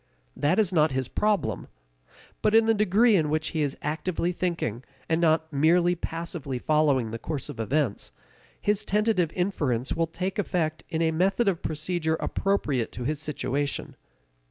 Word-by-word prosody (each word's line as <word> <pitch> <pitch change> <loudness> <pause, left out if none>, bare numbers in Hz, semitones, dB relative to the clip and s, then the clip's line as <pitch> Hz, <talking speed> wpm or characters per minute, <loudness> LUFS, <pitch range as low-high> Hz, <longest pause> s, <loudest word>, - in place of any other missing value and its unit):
That 150 +6 +1
is 205 -4 +2
not 155 -2 +4
his 130 -1 -1
problem. 200 - 0 0.7
But 215 - +3
in 225 0 +6
the 225 - +4
degree 210 +2 +4
in 155 -5 +2
which 155 +1 0
he 160 - -2
is 145 -2 -1
actively 165 +3 -1
thinking, 170 - -2 0.2
and 165 +1 +1
not 160 -1 +2
merely 170 +5 +4
passively 165 -5 -4
following 140 -5 +2
the 115 - -5
course 150 +1 -4
of 135 -6 -8
events, 120 - -1 0.5
his 210 -1 0
tentative 210 -5 +1
inferences 145 - -1
will 165 0 +1
take 185 +4 -4
effect 160 -5 -1
in 165 -1 0
a 160 - +2
method 195 +7 +1
of 185 -4 +1
procedure 160 +1 -1
appropriate 150 - -1
to 125 - -5
his 150 +3 -2
situation. 145 -2 -2
160 Hz, 160 wpm, -26 LUFS, 145-185 Hz, 0.7 s, in